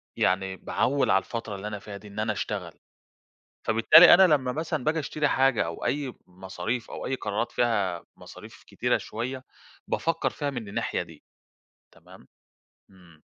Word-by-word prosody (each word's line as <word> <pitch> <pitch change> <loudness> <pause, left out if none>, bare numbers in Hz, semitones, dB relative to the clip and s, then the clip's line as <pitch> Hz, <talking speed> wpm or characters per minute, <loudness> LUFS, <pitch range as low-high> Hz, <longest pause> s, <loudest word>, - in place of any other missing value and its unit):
يعني 95 +1 0
باعوّل 140 +1 0
على 95 - +5
الفترة 115 -3 -5
اللي 100 +2 -6
أنا 105 -1 -5
فيها 100 0 -9
دي 105 - -14
إن 100 +1 -8
أنا 110 0 0
أشتغل، - - -4 0.9
فبالتالي 115 +11 +8
أنا 190 +1 +7
لمّا 130 -3 -1
مثلًا 155 -2 -3
باجي 160 +1 +1
أشتري 150 0 -1
حاجة 135 -7 +2
أو 85 - -6
أي 140 -3 -1
مصاريف، 95 +6 -5
أو - - -6
أي 135 - -1
قرارات 105 -1 -3
فيها 100 -8 0
مصاريف - - -13
كتيرة - - 0
شوية 130 +3 -5 0.4
بافكر 165 0 0
فيها 145 -2 -3
من 120 -6 -6
الناحية 100 - -2
دي - - -14 0.7
تمام، - - -18 0.6
إمم. 85 -4 -20
115 Hz, 155 wpm, -26 LUFS, 100-135 Hz, 0.9 s, فبالتالي